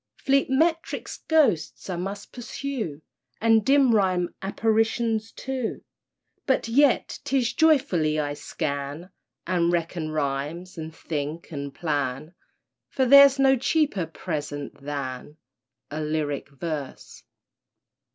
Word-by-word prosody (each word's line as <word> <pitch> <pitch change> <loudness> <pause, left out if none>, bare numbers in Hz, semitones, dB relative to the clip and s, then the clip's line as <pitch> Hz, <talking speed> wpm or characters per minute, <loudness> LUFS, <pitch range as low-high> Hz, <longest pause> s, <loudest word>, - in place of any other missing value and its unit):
Fleet 275 0 +2
metric 325 +5 +1 0.2
ghosts 280 - +2
I 185 - -3
must 195 +3 -5
pursue, 240 - -5 0.4
And 225 -1 +4
dim 270 -2 +4
rhyme 185 -4 +1
apparitions, 225 +2 0
too— 260 -3 -4 0.6
But 265 -4 +2
yet, 270 +3 +2
'tis 260 -4 0
joyfully 255 - +3
I 145 -1 -1
scan, 145 +3 -4 0.3
And 175 -2 +1
reckon 170 -2 -2
rhymes 155 +4 -3
and 160 -1 -6
think 155 +2 -5
and 140 -2 -5
plan 150 0 -2 0.6
For 260 - +1
there's 280 +1 +8
no 270 0 +5
cheaper 265 - +1
present 145 -4 -5
than 140 0 -5 0.5
A 155 +1 -3
lyric 150 -2 -2
verse. 145 -1 -6
180 Hz, 110 wpm, -25 LUFS, 150-255 Hz, 0.6 s, there's